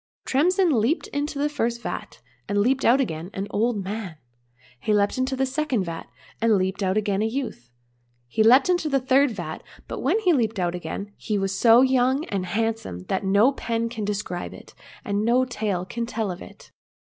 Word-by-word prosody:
— - - -62
Tremsin 355 +6 +3
leaped 275 - +1
into 290 0 -3
the 290 +1 +1
first 235 -5 -1
vat, 120 - -6 0.3
and 205 - 0
leaped 260 +6 +2
out 250 +4 +5
again 165 - -2
an 195 - -2
old 220 -1 0
man; 195 -3 -5 0.6
he 210 - +1
leaped 205 +5 +1
into 260 +1 0
the 265 0 +1
second 265 -5 -1
vat, 165 -2 -6 0.3
and 225 -2 +4
leaped 190 +2 -1
out 190 +1 +1
again 205 -2 0
a 220 - +2
youth; 225 - -5 0.6
he 120 - -1
leaped 250 +5 +6
into 350 -4 +1
the 275 -1 +2
third 265 +2 +3
vat, 175 -8 -6 0.3
but - - -5
when - - +2
he 360 -5 +4
leaped 225 -6 +1
out 175 -2 0
again, 180 +4 -5
he 210 - -2
was 195 -1 -1
so 230 +2 +6
young 260 +3 +2
and 190 -2 -2
handsome 225 - -2
that 190 - 0
no 200 +7 +4
pen 230 -3 -2
can 225 -2 -5
describe 205 -3 -3
it, - - -14 0.3
and 200 0 0
no 245 +3 +3
tale 210 -7 -2
can 235 +5 -4
tell 220 -4 -2
of 175 - -8
it. - - -13
225 Hz, 200 wpm, -24 LUFS, 195-260 Hz, 0.6 s, leaped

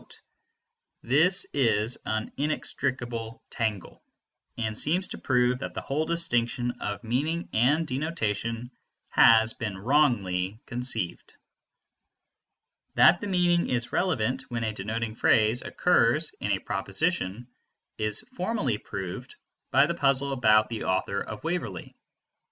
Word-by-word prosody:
This 160 +10 +4
is 115 -4 +1
an 110 0 -2
inextricable 120 -6 -3
tangle, 105 -5 -3 0.6
and 110 -2 -2
seems 175 - +1
to - - -6
prove 125 -1 +1
that - - -6
the - - -3
whole 155 +3 -2
distinction 120 -7 0
between 105 -5 -5
meaning 145 +9 -1
and 140 +9 +3
denotation 120 -5 -3 0.4
has 110 0 +6
been 105 -4 -5
wrongly 105 -6 +1
conceived. 120 -7 -2 1.6
That - - +6
the 205 - -4
meaning 175 -2 +2
is 120 -1 -2
relevant 130 - 0
when 120 -2 -3
a 110 -1 -2
denoting 110 +2 -3
phrase 110 +1 +3
occurs - - +2
in - - -2
a - - +2
proposition 105 +7 -2 0.5
is 110 -1 +1
formally 180 - -1
proved 100 +6 -7 0.3
by 140 +2 +5
the 170 - -1
puzzle 140 -3 +1
about 110 -4 +4
the 115 -2 -4
author 95 +1 0
of 110 -1 -7
Waverley. 175 +2 -4
120 Hz, 120 wpm, -27 LUFS, 110-145 Hz, 1.6 s, has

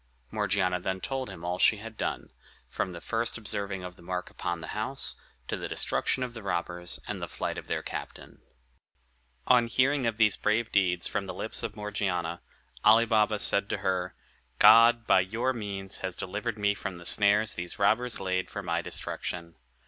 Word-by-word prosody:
Morgiana 90 -3 +1
then 95 +1 -2
told 130 +5 -3
him 85 - -9
all 90 +1 -2
she 110 - +5
had 110 +2 -9
done, - - -3 0.4
from 95 - -3
the 85 - -7
first 115 +1 -1
observing 100 -3 -3
the 90 - -19
mark 90 +1 -4
upon 85 -1 -3
the 80 - -8
house, 110 +6 -1 0.3
to - - -2
the - - -5
destruction 130 - 0
of 125 -1 -5
the 115 - -8
robbers, 85 -2 -2
and - - -4
the - - -3
flight - - -3
of - - -8
their - - -2
captain. - - -8 1.0
On 120 -2 +5
hearing 130 +2 +2
of 115 -2 -1
these 110 -3 +5
brave 110 +2 +1
deeds 90 -3 +2
from - - -2
the - - -5
lips - - -2
of - - -4
Morgiana, 95 -5 -2 0.4
Ali 110 +2 +7
Baba 110 -1 +3
said 100 0 +2
to - - -1
her, 90 -1 0 0.4
"God, 115 +3 +7
by 95 - +5
your 115 +8 0
means, 100 -4 -4
has 95 -1 -4
delivered 105 +4 -3
me 105 -1 +2
from 95 -2 -6
the 85 - -12
snares 105 +2 +3
these 90 0 -5
robbers 115 +4 +2
laid 95 -1 -1
for 100 - -6
my 85 -1 0
destruction. 85 0 -4
100 Hz, 185 wpm, -29 LUFS, 90-115 Hz, 1.0 s, Ali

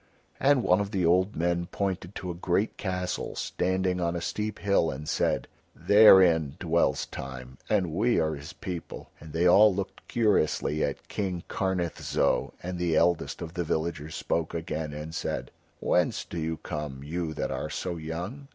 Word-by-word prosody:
And 135 -2 +4
one - - +4
of 100 - -3
the 95 -4 0
old 95 +4 +3
men 85 +1 0
pointed 95 0 -3
to 90 - -4
a - - -4
great 90 +4 0
castle 90 -2 -3
standing 95 0 -1
on 85 0 0
a - - -1
steep 105 +5 -3
hill 100 -5 +2
and 75 +3 -6
said: - - 0 0.3
"Therein 90 -8 +6
dwells 85 -1 +1
Time, 65 -1 -8
and 95 -6 +2
we 115 +7 +2
are 80 -1 +1
his 70 0 -8
people;" 90 -3 -7
and 80 0 -11
they 80 +3 +1
all 105 +4 +7
looked 100 0 -5
curiously 95 - +1
at - - -3
King 95 -4 -3
Karnith 95 -4 -2
Zo, - - +1
and 90 0 -4
the 85 -2 +1
eldest 85 +1 +1
of 80 0 -7
the 90 -1 -1
villagers 80 -1 -2
spoke 85 0 -2
again 80 -2 -3
and 75 +2 -7
said: - - -3 0.3
"Whence - - +1
do 85 - -5
you 80 0 -2
come, 75 -4 -5
you 80 +1 -3
that - - -2
are - - -3
so 90 -2 -3
young?" 90 - -6
85 Hz, 175 wpm, -28 LUFS, 80-95 Hz, 0.3 s, all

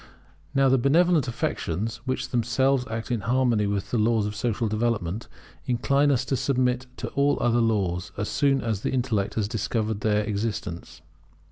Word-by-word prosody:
Now 135 0 +4
the 130 0 +4
benevolent 160 +3 +3
affections, 115 -1 -2
which 130 0 -2
themselves 125 +2 +1
act 115 +2 -4
in 120 -3 0
harmony 120 -2 +2
with 100 -1 -2
the 120 - +1
laws 110 -1 +2
of 105 0 -4
social 115 +1 -1
development, 110 -2 -1 0.4
incline 140 +4 +2
us 135 -2 +1
to 135 - 0
submit 125 -1 0
to - - -4
all 140 +1 +2
other 120 0 +2
laws, 95 -6 0
as 105 - -2
soon 140 -1 +2
as 110 -4 -2
the - - -1
intellect 120 -6 -1
has 110 -3 0
discovered 110 -1 -2
their 105 0 +2
existence. 105 -6 -4
115 Hz, 165 wpm, -25 LUFS, 105-130 Hz, 0.4 s, Now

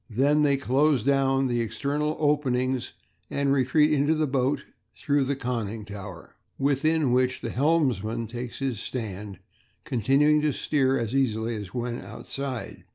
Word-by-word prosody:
They 120 +4 0
then 150 -2 +3
close 135 -1 +2
down 135 0 +2
external 140 +6 -1
openings, 130 -4 0 0.4
and 140 -1 +1
retreat 150 +3 +3
into 145 +2 +2
the 155 0 +1
boat 135 0 0 0.3
through 145 -1 +1
the 140 +1 -1
conning 115 -5 -3
tower, 100 -4 -9 0.2
within 145 +1 +2
which 125 +1 +1
the - - -4
helmsman 125 - +1
takes 120 +2 -6
his 130 -6 -2
stand, 105 -5 -5 0.5
continuing 140 +6 +3
to 150 -1 +1
steer 135 -2 +1
as 115 -1 -3
easily 115 -4 0
as 105 -4 -7
when 120 -1 -3
outside. 125 +5 -6
130 Hz, 140 wpm, -26 LUFS, 115-145 Hz, 0.5 s, then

